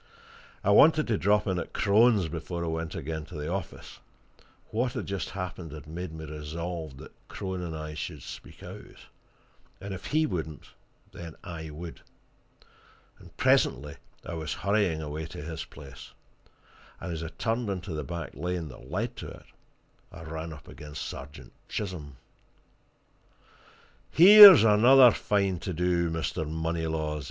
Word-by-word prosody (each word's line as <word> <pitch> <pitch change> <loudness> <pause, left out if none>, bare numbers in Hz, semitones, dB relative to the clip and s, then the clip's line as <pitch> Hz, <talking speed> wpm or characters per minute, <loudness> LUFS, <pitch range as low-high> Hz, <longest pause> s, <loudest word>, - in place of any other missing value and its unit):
I - - +3
wanted 155 -1 +6
to 110 - +2
drop 105 +2 +2
in 95 -3 -1
at - - -7
Crone's 105 -2 +4
before 85 +2 -5
I - - -2
went 80 0 -4
again 80 +1 -4
to 80 - -12
the 75 +1 -4
office: 95 - -7 0.7
what 120 +2 -1
had - - -4
just 100 -3 -4
happened, 90 -4 -6
had 75 -3 -9
made 85 +2 -6
me 80 0 -8
resolved 80 0 -6
that - - -12
Crone 95 -2 -5
and 80 -3 -5
I 75 0 -6
should 75 -1 -6
speak - - -11
out; - - -11 0.8
and 100 0 -6
if 95 - -7
he 155 +1 +2
wouldn't, 80 - -5 0.4
then 85 -2 -9
I 85 -4 -7
would. 80 +2 -9 1.2
And - - -17
presently 70 +3 +2 0.3
I - - -6
was 80 -3 -4
hurrying 100 -4 0
away 75 +1 -5
to 75 - -9
his 80 0 -6
place, 70 -1 -13 0.9
and 90 - -5
as 80 - -5
I 80 - -4
turned 115 +5 -2
into 95 -2 -4
the 75 -1 -3
back 85 -1 -6
lane 85 +2 -4
that 65 0 -13
led 110 - -3
to - - -7
it - - -12 0.7
I - - -10
ran 80 +1 -6
up 80 -2 -12
against 75 -2 -8
Sergeant 70 +2 -10 0.2
Chisholm. 80 -9 -5 1.9
"Here's 195 - +11
another 120 +4 +7
fine 100 -5 0
to 95 - -4
do, 85 0 +1
Mr. 80 -1 -3
Moneylaws!" 80 -1 -2
85 Hz, 155 wpm, -28 LUFS, 80-100 Hz, 1.9 s, Here's